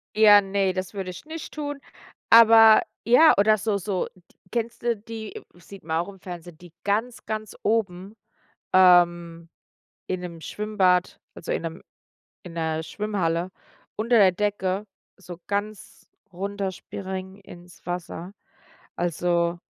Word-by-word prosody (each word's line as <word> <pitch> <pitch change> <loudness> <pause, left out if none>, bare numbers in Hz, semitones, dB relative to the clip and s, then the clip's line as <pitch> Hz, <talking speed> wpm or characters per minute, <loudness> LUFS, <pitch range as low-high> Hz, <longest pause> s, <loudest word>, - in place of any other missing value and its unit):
Ja, 210 -1 +7
ne, 195 -1 0
das 185 +2 -5
würde 190 -2 -5
ich 180 - -10
nicht 320 0 -8
tun. 290 -2 -5 0.5
Aber 225 -1 +8 0.2
ja, 280 +7 +7
oder 215 +1 +4
so 205 0 -1
so, 190 0 -2 0.4
kennst 235 0 -3
du 235 -1 +1
die 220 +1 -9
sieht 185 +2 -14
man 160 0 -2
auch 170 +3 -1
im 195 - -13
Fernsehen, 175 -3 -9
die 175 -2 -15
ganz, 220 +4 -2
ganz 215 -1 -5
oben, 200 -2 -1 0.6
ähm, 175 -2 +4 0.6
in 185 -1 -3
'nem 170 -2 -8
Schwimmbad, 190 -4 0 0.2
also - - -8
in - - -1
'nem 165 +1 -6 0.6
in 175 -3 -11
'ner 160 -1 -2
Schwimmhalle, 185 -3 -2 0.4
unter 230 +2 +2
der 190 -3 +6
Decke 200 0 -2 0.3
so 180 -3 -11
ganz 205 0 -5 0.3
runterspringen 190 0 -5
ins 175 -2 -15
Wasser. 175 +1 -6 0.6
Also, 175 0 0
190 Hz, 130 wpm, -24 LUFS, 175-215 Hz, 0.6 s, Aber